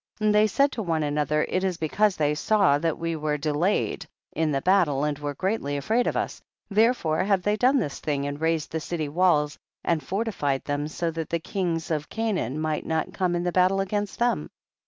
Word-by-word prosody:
13. 215 - 0
And 210 - +4
they 210 +1 +5
said 275 +6 +2
one 165 -6 0
to 145 -1 -1
the 150 +1 +1
other, 150 +1 +1
it 185 - -1
is 185 -3 0
becausethey 160 -2 +1
sawthatwe 165 -3 +1
were 150 -1 -1
de 150 +1 -1
layed, 175 +8 0 0.2
in 160 -1 0
the 135 -1 -1
battle, 175 -8 +3
and 150 -1 -1
were 145 -1 -4
greatly 185 -6 -1
afraid 225 - +1
of - - 0
us, - - -3 0.3
therefore 210 -7 +2
have 195 -2 +1
they 210 0 +2
done 255 +5 +3
this 170 - -2
thing 140 -2 -2
and 145 +1 -4
raised 160 -1 0
the 160 - -1
city 155 -1 -3
walls 150 -2 +2 0.2
and 165 -2 +1
fortified 185 -10 -1
them 145 0 -2
so 165 +2 -2
that 165 0 -5
the 170 - +1
kings 170 -1 -2
of 150 -1 -2
Canaan 195 - -2
might 155 -1 -1
not 160 -1 -2
come 180 -2 0
in 175 - -1
battle 185 +2 +3
against 205 +1 -2
them. 240 0 0
165 Hz, 205 wpm, -25 LUFS, 150-195 Hz, 0.3 s, they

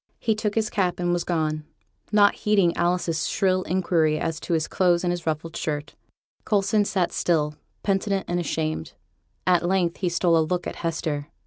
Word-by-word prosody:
He 225 - +1
took 215 -1 -2
his 220 -1 0
cap 185 -4 0
and 175 0 +1
was 175 - 0
gone, 155 -3 -1 0.5
not 205 -1 +5
heeding 200 -5 +2
Alice's 175 -2 0
shrill 185 -1 +2
inquiry 170 -4 +1
as 165 -1 -2
to - - -3
his 160 -1 +1
clothes 175 -2 +2
and 175 -1 +1
his 175 -2 -6
ruffled 160 +1 -2
shirt. 150 -1 -3 0.5
Coulson 205 0 +2
sat 185 -4 0
still, 150 -3 +1 0.3
penitent 195 0 0
and 175 0 0
ashamed; 155 -2 -2 0.5
at 180 -2 +3
length 175 -1 +1
he 185 - 0
stole 170 -1 +3
a - - +4
look 175 +3 -1
at - - -5
Hester. 155 -3 -2
175 Hz, 180 wpm, -24 LUFS, 160-190 Hz, 0.5 s, not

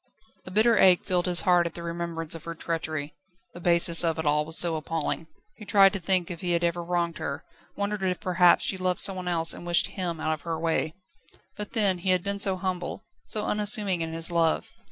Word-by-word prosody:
A - - -5
bitter 220 +4 +3
ache 185 -2 +5
filled 180 -1 0
his 175 -2 +4
heart 175 -2 +3
at 165 - -10
the 170 - -7
remembrance 170 -1 -3
of 165 - -10
her 170 0 -6
treachery. 155 -3 -4 0.4
The 175 - -10
baseness 170 -1 +6
of 165 -1 0
it 160 - -4
all 150 0 +1
was 160 +1 -2
so 170 -2 +3
appalling. 160 0 -3 0.3
He - - -11
tried 195 -1 +4
to 200 - -3
think 180 0 +1
if 170 - -7
he 175 -1 0
had 170 0 0
ever 170 0 -1
wronged 170 -1 -2
her; 140 +3 -5 0.3
wondered 205 0 -2
if 185 -1 -1
perhaps 180 -2 +3
she 190 - -1
loved 185 -1 0
someone 185 -2 -2
else, 165 -2 +1
and - - -10
wished 175 0 +1
him 175 -4 -4
out 155 0 -1
of 155 - -7
her 165 -2 -4
way. 160 -1 -1 0.6
But, 210 -1 -6
then, 200 -5 +2
he 185 +2 -3
had 185 -1 +2
been 200 0 -3
so 195 -1 +3
humble, 185 +1 -4 0.2
so 210 -1 -2
unassuming 210 -4 0
in 165 0 -4
his 165 +1 0
love. 165 -1 0
175 Hz, 225 wpm, -26 LUFS, 165-185 Hz, 0.6 s, baseness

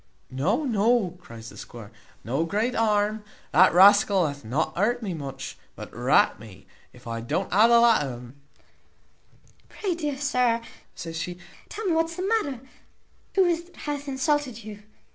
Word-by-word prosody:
"No, 180 - 0
no," 230 - +2
cries 115 -9 -11
the - - -14
squire, 115 -3 -10 0.3
"no 135 +8 -1
great 210 +8 -1
harm. 215 -1 +1 0.3
The 185 +3 +6
rascal 195 0 +6
hath 145 -3 -5
not 130 +9 -2
hurt 235 +6 0
me 195 -4 -3
much, 135 -4 -7 0.2
but - - -10
rat - - +3
me 100 -3 -14 0.3
if 125 0 -18
I 115 -1 -4
don't 175 +12 -2
ha 215 +4 +6
the 235 0 +6
la 235 -1 +5
o' 135 -3 -3
un." 120 0 -12 1.4
"Pray, 390 -4 -3
dear 300 -5 -3
sir," 250 -4 +1 0.4
says 165 -1 -6
she, 175 +1 -5 0.3
"tell 440 - -6
me 370 - +1
what's 325 +1 0
the 365 - -4
matter; 295 - -1 0.7
who 385 -1 +5
is 340 -2 +1
it 340 - -12
that 355 - -22
hath 290 -1 -4
insulted 270 -3 -1
you?" 210 -1 -9
210 Hz, 170 wpm, -25 LUFS, -, 1.4 s, The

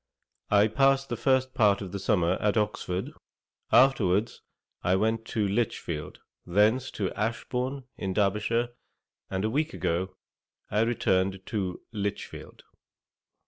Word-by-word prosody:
I 105 +1 +5
past 135 +4 +2
the 120 - -1
first 130 +2 +1
part 105 -5 +4
of 95 -3 -6
the 100 - -4
summer 95 -4 +2
at 105 +1 +2
Oxford, 95 -3 -1 0.6
afterwards 115 -5 +3 0.4
I 90 - +2
went 110 +3 0
to 110 -2 -1
Lichfield, 90 -8 -2 0.2
thence 105 +8 +2
to 100 -3 -1
Ashbourne, 125 +4 -2
in 95 - -3
Derbyshire, 105 +4 +1 0.6
and 95 +2 -1
a - - +1
week 150 +4 -1
ago 90 +3 -1 0.6
I 105 - +2
returned 95 -4 +1
to 95 -5 -3
Lichfield. 105 -2 -5
105 Hz, 125 wpm, -28 LUFS, 95-120 Hz, 0.6 s, I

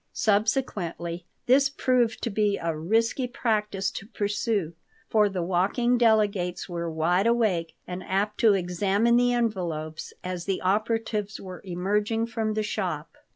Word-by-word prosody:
Subsequently 200 -6 0 0.2
this 270 +2 +5
proved 250 -5 +1
to 235 - -1
be 205 0 +1
a 165 -1 -2
risky 225 - +1
practice 210 -6 -1
to 195 - -7
pursue, 205 -5 -1 0.4
for 210 -2 +4
the 185 -3 -2
walking 195 +8 +2
delegates 210 -6 +2
were 170 -2 -3
wide 175 +6 +1
awake 190 -9 +1
and 180 +1 -6
apt 205 +3 -1
to 220 -3 +5
examine 195 +5 +2
the 245 0 +4
envelopes 175 -10 -2
as 180 -1 -4
the 195 -2 -1
operatives 215 +1 -1
were 185 -2 -9
emerging 205 +5 0
from 220 -2 -2
the 215 - 0
shop. 210 - -3
205 Hz, 140 wpm, -26 LUFS, 180-225 Hz, 0.4 s, this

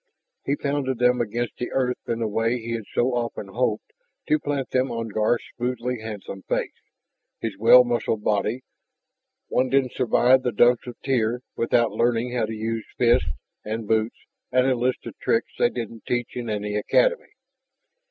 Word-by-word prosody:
He 140 - +1
pounded 140 -3 -1
them 125 0 +3
against 120 +1 -3
the 125 - -3
earth 125 -1 0
in 115 0 -1
a - - 0
way 115 +3 0
he 115 0 -6
had 115 -2 -3
so 125 +1 +1
often 115 -4 -3
hoped 110 0 -1 0.3
to 155 - +3
plant 145 -2 -3
them 130 +1 +1
on 115 -1 -3
Garth's 110 +3 +1
smoothly 125 0 -2
handsome 105 -3 -7
face, - - -1 0.7
his 110 -3 -3
well 120 +3 +8
muscled 120 -3 -1
body. 110 +4 0 0.8
One 130 +1 +1
didn't 135 -1 +2
survive 125 +1 +4
the 125 -2 -1
Dumps 120 +3 +4
of 120 - -6
Tyr 120 -2 +1
without 115 0 +2
learning 120 +1 +1
how 120 -3 +1
to 110 - -5
use 110 +1 -3
fists, 120 -7 +3 0.3
and 110 0 -4
boots, 110 +1 +1 0.3
and 130 0 +3
a 135 - +3
list 125 +1 -1
of - - -7
tricks - - 0
they - - +4
didn't 115 -2 -7
teach 120 -1 -2
in 120 -2 -4
any 105 -1 -2
academy. 480 - +1
120 Hz, 170 wpm, -24 LUFS, 110-125 Hz, 0.8 s, well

